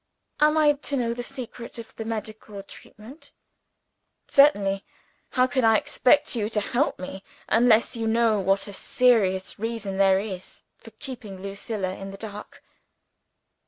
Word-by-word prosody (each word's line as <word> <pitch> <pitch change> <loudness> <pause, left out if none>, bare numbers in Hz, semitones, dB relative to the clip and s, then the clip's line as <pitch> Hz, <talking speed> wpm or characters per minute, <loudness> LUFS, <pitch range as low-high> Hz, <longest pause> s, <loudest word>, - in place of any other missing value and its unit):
"Am 300 +1 +4
I 300 -1 +5
to 285 0 -3
know 235 -2 0
the 245 - -5
secret 240 -1 -8
of 230 -1 -10
the 225 - -6
medical 215 -2 -6
treatment?" 225 +8 -15 0.9
"Certainly! 205 -9 +4 0.5
How 255 -1 +4
can 260 0 0
I 225 -1 +5
expect 260 +5 +2
you 215 -2 -1
to 220 - 0
help 240 +7 0
me 190 +1 -8 0.2
unless 230 +1 +4
you 225 -1 -2
know 225 -1 +2
what 195 +1 +1
a 200 - -8
serious 195 -6 +1
reason 220 -3 -4
there 195 -1 +4
is 195 -3 -7
for - - -15
keeping 235 -8 -9
Lucilla 195 -1 -4
in 195 0 -8
the 195 - -9
dark." 210 0 -9
220 Hz, 150 wpm, -25 LUFS, 195-245 Hz, 0.9 s, I